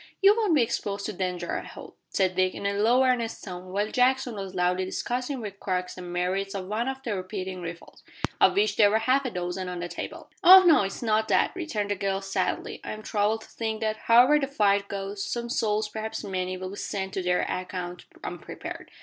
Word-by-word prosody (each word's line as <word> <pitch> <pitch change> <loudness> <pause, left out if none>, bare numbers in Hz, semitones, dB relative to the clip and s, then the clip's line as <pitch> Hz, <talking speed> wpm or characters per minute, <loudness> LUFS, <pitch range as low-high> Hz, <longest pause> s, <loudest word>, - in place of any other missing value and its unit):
"You 400 +1 +6
won't 425 -8 +2
be 270 - +5
exposed 200 -3 -3
to 215 - -3
danger, 180 -1 -3
I - - -2
hope," - - -11
said 185 -2 +1
Dick, 185 0 +1
in - - -6
a 200 - +1
low 230 +6 +4
earnest 245 -3 0
tone, 180 -1 -8
while 205 +3 -1
Jackson 255 0 +2
was 195 -2 -6
loudly 180 +1 +1
discussing 250 +7 -3
with 200 -2 -7
Crux 180 -1 -2
the 185 - -9
merits 180 +3 -2
of 190 -2 -4
one 215 +5 -2
of 265 0 -4
the 225 -5 -2
repeating 185 -1 -5
rifles 170 0 -9 0.4
of - - +5
which 415 +1 +2
there 205 -2 +7
were 215 - +3
half 255 +5 +2
a - - 0
dozen 180 -1 -4
on 180 -1 -5
the 175 - -3
table. - - -7
"Oh 375 +1 +10
no! 330 - +6
It 195 - 0
is 195 - -7
not 220 -1 +2
that," - - +3
returned 220 - -2
the - - +1
girl 195 0 -1
sadly. 195 0 -2
"I - - -4
am 215 0 -9
troubled 215 +1 0
to - - -14
think 220 -1 -3
that, 220 0 0
however 250 +6 +5
the 275 - -1
fight 200 -6 +2
goes, 195 0 -4
some 235 0 -3
souls, 215 -1 +1
perhaps 220 +1 -5
many, 185 -2 -3
will 185 0 -6
be 200 - -8
sent 190 -1 -4
to 190 - -1
their 180 0 +1
account 180 -1 -4 0.2
unprepared. - - -7
205 Hz, 225 wpm, -27 LUFS, 185-235 Hz, 0.4 s, Oh